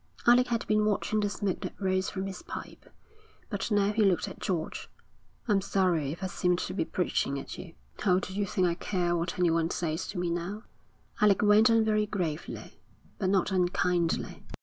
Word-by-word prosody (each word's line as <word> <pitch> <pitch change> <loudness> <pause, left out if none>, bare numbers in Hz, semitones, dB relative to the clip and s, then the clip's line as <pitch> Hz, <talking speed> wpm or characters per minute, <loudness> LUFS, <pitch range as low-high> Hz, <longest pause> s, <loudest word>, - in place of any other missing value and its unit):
Alec 245 +1 +6
had 235 -1 -1
been 215 0 +2
watching 215 +1 +1
the 205 -1 +1
smoke 200 -2 -2
that - - -6
rose 190 -1 0
from 190 -1 -4
his 195 -1 -6
pipe, - - -9 0.6
but 205 +1 -2
now 205 -1 +3
he 220 0 +3
looked 190 -4 +2
at - - -9
George. 175 -5 -3 0.6
'I'm 205 -3 +3
sorry 180 -7 +1
if 175 +5 -7
I - - 0
seem 180 -1 +1
to 180 - -3
be 190 - 0
preaching 160 -5 -1
at - - -7
you.' 170 -3 -10 0.3
'Oh, 185 -3 +4
do 190 - -6
you 200 0 -1
think 185 0 +1
I 175 - +2
care 175 -1 -1
what 170 +1 -2
anyone 165 -2 +2
says 165 -3 -2
to 195 - -6
me 175 -1 -1
now?' 180 +6 -4 0.6
Alec 210 -1 +4
went 210 +2 +6
on 225 -1 +4
very 215 -1 +2
gravely, 175 -7 -4 0.4
but 190 - +1
not 190 0 +2
unkindly. 180 -2 0
190 Hz, 195 wpm, -29 LUFS, 175-205 Hz, 0.6 s, Alec